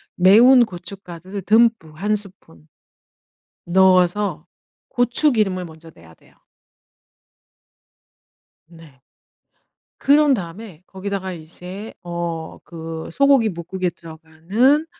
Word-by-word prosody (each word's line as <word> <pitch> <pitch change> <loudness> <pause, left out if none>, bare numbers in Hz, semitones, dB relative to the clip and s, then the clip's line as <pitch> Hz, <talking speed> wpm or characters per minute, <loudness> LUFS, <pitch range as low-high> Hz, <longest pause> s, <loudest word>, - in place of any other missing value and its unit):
매운 235 +7 +6
고춧가루를 185 0 -9
듬뿍 220 -7 +2
1 210 +1 +1
스푼 185 - -9 1.0
넣어서 185 -1 +2 0.4
고추기름을 240 -7 +2
먼저 165 0 -13
내야 80 0 -18
돼요. - - -25 2.3
네. 165 -5 -17 1.0
그런 290 0 +4
다음에 180 -2 -7
거기다가 190 -1 -5
이제 180 +6 -9
어 170 -2 -4 0.2
그 165 -1 -8
소고기뭇국에 190 -9 +1
들어가는 170 - -1
185 Hz, 195 characters per minute, -20 LUFS, 165-215 Hz, 2.3 s, 매운